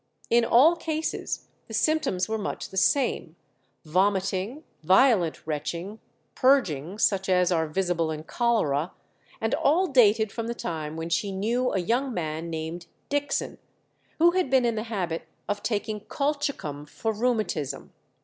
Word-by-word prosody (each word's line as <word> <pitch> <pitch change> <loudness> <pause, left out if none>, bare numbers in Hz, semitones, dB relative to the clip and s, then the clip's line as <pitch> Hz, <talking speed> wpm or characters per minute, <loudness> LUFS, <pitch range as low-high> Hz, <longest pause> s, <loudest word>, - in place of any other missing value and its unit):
In 235 0 +5
all 275 +9 +6
cases 320 -1 -3 0.2
the - - -5
symptoms 285 - +1
were 220 0 -2
much 205 - -4
the - - -10
same, 190 - +1 0.5
vomiting, 195 - 0 0.2
violent 185 - +3
retching, 170 +7 -4 0.3
purging, 190 - +2
such 195 -3 +1
as 180 -1 +3
are 160 -2 +1
visible 170 0 0
in 155 -1 -4
cholera, 170 - 0 0.5
and 225 0 -1
all 340 +7 +3
dated 220 - +4
from 230 -1 -4
the 235 - -3
time 155 -6 -4
when 165 +1 -4
she 200 +4 0
knew 230 +6 0
a - - 0
young 240 +9 0
man 160 -1 -3
named 165 +1 -5 0.2
Dixon, 290 0 -1 0.6
who 340 +2 +6
had 365 -5 0
been 260 -2 +4
in 235 - +2
the 215 0 -3
habit 175 -7 -3 0.2
of 205 0 -2
taking 215 -1 -2
colchicum 280 - -3
for 225 +8 -3
rheumatism. 215 - -2
205 Hz, 145 wpm, -26 LUFS, 170-250 Hz, 0.6 s, all